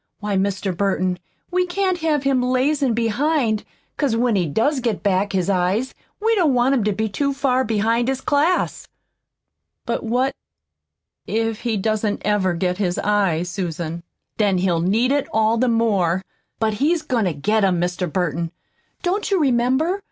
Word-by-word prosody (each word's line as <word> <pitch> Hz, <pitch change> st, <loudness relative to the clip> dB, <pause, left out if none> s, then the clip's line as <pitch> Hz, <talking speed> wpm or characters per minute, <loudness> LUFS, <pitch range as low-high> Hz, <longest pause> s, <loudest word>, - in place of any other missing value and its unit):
Why, 205 Hz, -1 st, -2 dB
Mr. 195 Hz, -1 st, -1 dB
Burton, 185 Hz, -1 st, 0 dB, 0.3 s
we 365 Hz, 0 st, +1 dB
can't 370 Hz, 0 st, 0 dB
have 310 Hz, -4 st, 0 dB
him 270 Hz, -2 st, +2 dB
lazin' 260 Hz, 0 st, +1 dB
behind, 235 Hz, 0 st, +1 dB, 0.3 s
'cause 275 Hz, -6 st, +1 dB
when 235 Hz, -1 st, +2 dB
he 180 Hz, -4 st, +1 dB
does 260 Hz, -, +1 dB
get 230 Hz, -5 st, -2 dB
back 200 Hz, 0 st, +1 dB
his 185 Hz, -2 st, 0 dB
eyes 195 Hz, +6 st, 0 dB, 0.3 s
we 450 Hz, +2 st, +2 dB
don't 335 Hz, -, +3 dB
want 245 Hz, +2 st, +3 dB
him 250 Hz, -6 st, +1 dB
to 210 Hz, -, +2 dB
be 220 Hz, +2 st, -1 dB
too 280 Hz, +7 st, -1 dB
far 260 Hz, -2 st, +1 dB
behind 230 Hz, +1 st, +1 dB
his 265 Hz, 0 st, 0 dB
class." 295 Hz, +6 st, 0 dB, 1.0 s
"But 235 Hz, -, -1 dB
what 250 Hz, +4 st, 0 dB, 0.9 s
if 225 Hz, 0 st, -1 dB
he 230 Hz, -2 st, -1 dB
doesn't 215 Hz, +1 st, -1 dB
ever 195 Hz, -4 st, +1 dB
get 180 Hz, +2 st, -1 dB
his 180 Hz, -3 st, 0 dB
eyes, 195 Hz, -5 st, +1 dB
Susan?" 170 Hz, -3 st, -4 dB, 0.4 s
"Then 205 Hz, -3 st, +2 dB
he'll 180 Hz, -2 st, +1 dB
need 220 Hz, +9 st, +2 dB
it 285 Hz, -1 st, +1 dB
all 220 Hz, +1 st, +2 dB
the 255 Hz, 0 st, +2 dB
more. 195 Hz, -6 st, +1 dB, 0.3 s
But 220 Hz, -1 st, 0 dB
he's 320 Hz, +2 st, +2 dB
goin' 245 Hz, -7 st, 0 dB
to 180 Hz, -, 0 dB
get 210 Hz, +9 st, +1 dB
'em, 185 Hz, -3 st, +2 dB
Mr. 175 Hz, -1 st, -2 dB
Burton. 170 Hz, -2 st, -1 dB, 0.5 s
Don't 385 Hz, +3 st, -1 dB
you 390 Hz, -2 st, +2 dB
remember? 265 Hz, +7 st, +2 dB
220 Hz, 165 wpm, -21 LUFS, 190-265 Hz, 1.0 s, don't